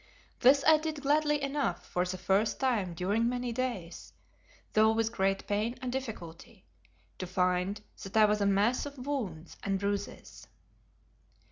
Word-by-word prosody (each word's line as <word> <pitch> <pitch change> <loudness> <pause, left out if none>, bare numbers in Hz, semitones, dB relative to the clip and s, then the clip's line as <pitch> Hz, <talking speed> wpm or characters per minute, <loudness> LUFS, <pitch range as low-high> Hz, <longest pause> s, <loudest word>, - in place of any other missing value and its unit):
This 275 +3 +5
I 315 0 +7
did 310 -2 -4
gladly 295 +1 +2
enough 275 -10 -1
for 180 0 -1
the 185 +1 -4
first 195 +4 +1
time 215 -10 0
during 205 +7 +1
many 245 -1 -2
days, 230 -8 -4 0.6
though 220 +1 +5
with 225 0 0
great 195 -3 0
pain 215 +4 -1
and 255 -1 -4
difficulty, 215 -6 -7 0.5
to 185 - -4
find 180 +2 0 0.2
that 195 +2 -4
I 215 - +8
was 210 0 +1
a 200 - +3
mass 210 +8 +2
of 285 0 -10
wounds 200 - -4
and 195 -1 -1
bruises. 200 0 -4
215 Hz, 150 wpm, -30 LUFS, 190-255 Hz, 0.6 s, I